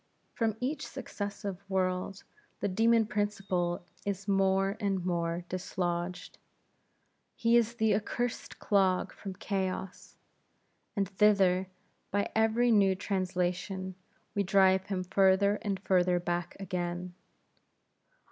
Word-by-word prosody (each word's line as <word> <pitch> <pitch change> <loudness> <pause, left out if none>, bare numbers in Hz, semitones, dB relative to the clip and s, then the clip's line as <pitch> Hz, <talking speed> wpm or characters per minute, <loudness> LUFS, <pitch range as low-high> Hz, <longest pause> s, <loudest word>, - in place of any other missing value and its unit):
From 220 -2 0
each 280 +4 -2
successive 205 -6 -5
world, 185 0 -1 0.4
the - - 0
demon 225 +3 +3
Principle 195 -5 -1 0.2
is 200 0 -3
more 195 0 +2
and 195 -4 -1
more 170 -1 -1
dislodged; 180 -1 -3 1.0
he 230 -1 +3
is 235 0 +3
the 220 -2 +2
accursed 230 +3 -2
clog 190 -3 +2
from 195 -2 -7
chaos, 190 -1 -4 0.8
and 200 -2 +1
thither, 190 -2 +3 0.4
by 200 0 -1
every 225 +2 +3
new 195 -3 +4
translation, 185 0 -2 0.4
we 205 - +1
drive 190 -1 +4
him 190 -2 -2
further 195 +2 +3
and 200 -3 -2
further 180 -2 +2
back 175 0 -3
again. 175 -1 -3
195 Hz, 110 wpm, -30 LUFS, 185-205 Hz, 1.0 s, new